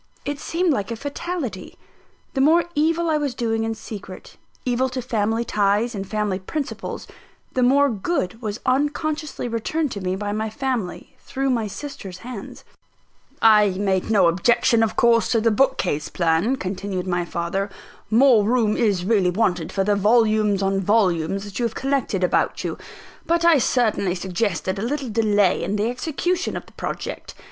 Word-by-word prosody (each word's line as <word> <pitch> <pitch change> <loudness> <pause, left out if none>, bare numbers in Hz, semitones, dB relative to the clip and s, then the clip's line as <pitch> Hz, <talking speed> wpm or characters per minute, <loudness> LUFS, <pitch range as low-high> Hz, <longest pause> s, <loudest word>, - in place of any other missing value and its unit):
It 285 0 -3
seemed 335 +1 0
like 205 -4 -2
a 230 - -3
fatality. 285 - -5 0.6
The 270 - 0
more 325 +5 +5
evil 330 +3 +1
I 310 -2 +2
was 285 -4 -2
doing 225 -2 -1
in 225 0 -2
secret, 205 -3 -9 0.3
evil 255 +1 +1
to 255 +1 -4
family 225 -1 -1
ties 210 +3 +1
and 195 -2 -5
family 210 -3 -1
principles, 280 +9 -5 0.5
the 255 - 0
more 275 +3 +5
good 225 - -2
was 215 -1 -4
unconsciously 295 +1 -1
returned 255 +6 -1
to 200 - -5
me 185 0 -1
by 205 +1 -3
my 215 +1 -2
family, 240 -5 -4
through 270 0 -2
my 230 -4 0
sister's 205 -6 -8
hands. 240 -6 -8 0.8
"I 210 -3 +6
made 190 -1 0
no 200 -5 +5
objection, 230 +7 +3
of 225 -1 +1
course, 235 -1 +3
to 230 - +3
the 225 +1 +2
bookcase 210 - +1
plan," 170 +8 +1
continued 190 -3 -4
my 175 -1 0
father. 175 +4 -2 0.4
"More 235 -1 +5
room 220 -1 +2
is 200 -6 +1
really 200 -4 +3
wanted 180 -4 0
for 195 - 0
the 205 +1 +2
volumes 215 -1 +3
on 195 0 +1
volumes 195 -2 +1
that 205 +1 -7
you 240 - +1
have 225 - -3
collected 265 -8 -1
about 180 - +1
you; - - -3 0.5
but 335 0 +2
I 335 -4 +6
certainly 220 -7 +1
suggested 190 0 -2
a - - -3
little 265 +3 -2
delay 210 -3 +2
in 200 - -1
the 210 +3 0
execution 340 +7 -2
of - - -8
the - - -19
project. - - -6
225 Hz, 170 wpm, -22 LUFS, 195-260 Hz, 0.8 s, I